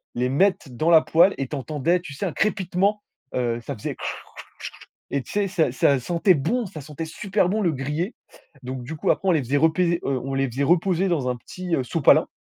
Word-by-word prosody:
les 125 +1 0
mettre 170 0 +2
dans 155 +8 0
la 160 -1 +8
poêle 170 +5 +4
et 135 - -3
tu 150 - -5
entendais, 155 +5 0
tu 145 -6 -9
sais 195 - -4
un 170 - -3
crépitement, 200 0 0 0.3
heu, 120 -2 0
ça 140 +3 -6
faisait 105 - -5
kr, - - -15
kr, - - -1
ch, - - -6 0.9
et 140 -2 -1
tu - - -12
sais 205 -1 0
ça 165 -8 +1
ça 135 +1 +3
sentait 170 - +2
bon. 230 - -1
Ça 160 -5 -9
sentait 150 +3 -6
super 190 +3 0
bon 215 +2 0
le 170 -4 +2
grillé! 150 - -3 0.5
Donc 130 0 -5
du 155 +6 -6
coup - - -2
après 195 - -2
on - - +6
les 155 -5 +2
faisait 140 +4 0
repés 170 +3 +2
heu, 135 -2 0
on 135 0 -4
les 135 0 +1
faisait 135 +4 -1
reposer 180 +4 +2
dans 145 -7 0
un 125 - -1
petit, 180 +6 -4
heu, 130 - -1
sopalin. 145 +3 +4
160 Hz, 235 wpm, -23 LUFS, 135-185 Hz, 0.9 s, la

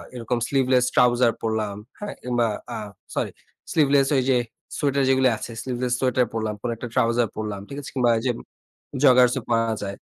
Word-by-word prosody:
এরকম 120 0 -2
sleeveless 130 -2 +3
trouser 120 -1 +4
পড়লাম, 110 -2 -1 0.2
হ্যাঁ, 205 -1 -5
কিংবা 120 -2 +1 0.2
অ্যা - - -4 0.4
সরি - - -1 0.4
স্লিভলেস 140 -3 +4
ওই 130 - +2
যে 125 - +4 0.4
সোয়েটার 140 -1 +1
যেগুলি 130 -1 +4
আছে, 120 - -7
স্লিভলেস 125 -1 -2
সোয়েটার 125 -1 +2
পড়লাম, 110 -1 -2
কোন 120 - -2
একটা 120 +2 -6
ট্রাউজার 115 0 +2
পড়লাম। 105 -2 -4
ঠিক 140 - -7
আছে? - - -8
কিংবা 120 -2 +3
এইযে 125 +2 0
ম - - -9 0.6
জগার্সও 125 -1 +5
পরা 115 -1 +2
যায়। 100 0 -4
125 Hz, 170 wpm, -24 LUFS, 115-130 Hz, 0.6 s, জগার্সও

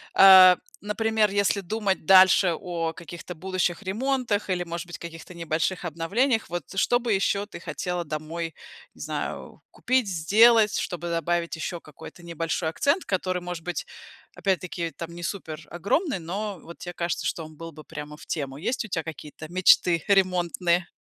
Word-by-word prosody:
э, 185 -1 +9 0.3
например, 215 +1 +1
если 200 0 +1
думать 200 -2 -2
дальше 185 -1 +7
о 170 -3 -3
каких-то 175 +1 -9
будущих 185 +1 -2
ремонтах 225 +1 -1
или, 180 -1 0
может 170 0 -6
быть, 175 - -7
каких-то 170 +1 -10
небольших 170 +2 -2
обновлениях, 210 - 0
вот 175 -1 -3
что 245 +5 +3
бы 235 -3 0
еще 200 +1 +1
ты 205 - -10
хотела 180 0 -3
домой, 160 +2 -5 0.4
не - - -13
знаю, - - -5
купить, 255 -3 0
сделать? 210 +5 +5
Чтобы 175 -1 -4
добавить 170 +1 -1
еще 170 +2 -4
какой-то 155 +3 -13
небольшой 165 -1 -2
акцент, 285 - 0
который, 185 -1 -1
может 175 -2 -6
быть, 180 +1 -4 0.5
опять-таки 180 -3 -2
там 170 0 -6
не 175 - -9
супер 165 -4 -5
огромный, 205 - 0
но 195 +3 -4
вот 170 +1 -12
те 175 - -7
кажется, 170 0 -2
что 165 - -3
он 155 0 -13
был 165 +2 -8
бы 155 0 -12
прямо 150 +1 -8
в - - -13
тему. 140 -4 -4
Есть 235 - -2
у - - -8
тя 165 -5 -2
какие-то 155 -1 -9
мечты 175 -1 +4
ремонтные? 180 -2 +2
175 Hz, 165 wpm, -25 LUFS, 165-200 Hz, 0.5 s, э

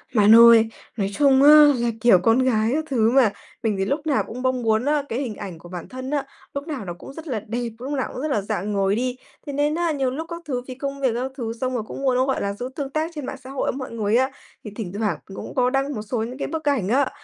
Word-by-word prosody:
Bạn 210 +1 +7
ơi, 230 -1 +8 0.3
nói 195 -2 0
chung 275 +2 +4
á, 290 - +8 0.3
là, 240 - 0
kiểu, 235 -6 +6
con 225 +7 +3
gái 230 -4 +2
các 315 +2 -1
thứ 230 -4 +2
mà, 255 -6 +4 0.3
mình 220 -2 +1
thì 195 - +1
lúc 290 +7 -2
nào 285 - +2
cũng 250 +3 -7
bong 255 -1 0
muốn 220 +1 +2
á, 295 0 +1
cái 230 - -2
hình 245 -6 -4
ảnh 190 -6 -8
của 175 - -13
bản 175 -2 -7
thân 260 +1 -6
á, 285 -2 -1 0.3
lúc 280 +2 -5
nào 280 -10 -5
nó 175 - -4
cũng 270 - -10
rất 320 +2 -10
là 245 -7 -2
đẹp, 235 +1 -2
lúc 265 +3 -5
nào 265 -2 -1
cũng - - -5
rất 305 - -1
là 215 - +1
rạng 205 0 -3
ngời 195 0 +1
đi, 250 +2 -2 0.3
thế 285 - -4
nên 295 +2 +1
á, 340 -1 0
nhiều 270 -4 0
lúc 315 +5 -5
các 340 0 -6
thứ 255 -5 -2
vì 255 - -7
công 275 +1 -5
việc 260 -3 +2
các 255 +2 -2
thứ 230 -3 -3
xong 255 0 -1
rồi 240 -3 -2
cũng - - -7
muốn 265 -2 +2
nó, 255 +1 +3
gọi 265 -1 -1
là, 200 0 -1
giữ 245 +5 -6
tương 280 -3 -4
tác 310 +4 -2
trên 295 -3 -5
mạng 265 - -5
xã 260 - -10
hội 270 0 -1
với - - -7
mọi 260 -2 -6
người 220 -2 0
á, 260 +2 +2 0.3
thì 210 - -7
thỉnh 200 -6 -5
thoảng 205 -8 -1 0.2
cũng - - -8
có 250 -1 +3
đăng 275 +1 -1
một 215 - -4
số 220 +4 -4
những 245 +3 -6
cái - - -3
bức 320 -1 -4
ảnh 250 -10 0
á. 265 +3 +2
255 Hz, 295 wpm, -23 LUFS, 220-275 Hz, 0.3 s, ơi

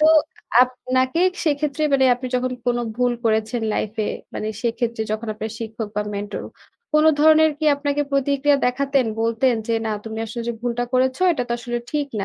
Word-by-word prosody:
তো 305 - +6 0.6
আপনাকে 255 +3 0 0.2
সেক্ষেত্রে 300 0 0
মানে 270 -1 +4
আপনি 250 +1 -6
যখন 250 0 0
কোনো 240 0 +1 0.2
ভুল 245 0 +2
করেছেন 220 +1 +1
লাইফে 215 0 -2 0.3
মানে 215 - -3
সেক্ষেত্রে 235 -1 -1
যখন 215 +2 -3
আপনার 220 +1 -5
শিক্ষক 225 -1 -5
বা 210 - +1
মেন্টর 205 +1 -4 0.5
কোনো 305 +1 +6
ধরনের 315 +1 +6
কি 310 - -3
আপনাকে 285 0 0
প্রতিক্রিয়া 280 +1 +2
দেখাতেন? 275 0 +1
বলতেন 230 +3 +2
যে, 230 - 0
"না, - - -1
তুমি 220 0 -6
আসলে 235 +2 -5
যে - - 0
ভুলটা 245 0 -1
করেছ, 260 0 +2 0.2
এটা 275 -6 -1
তো - - -1
আসলে 240 0 -3
ঠিক 295 -1 -1
না। 200 - -1
250 Hz, 175 wpm, -22 LUFS, 225-280 Hz, 0.6 s, তো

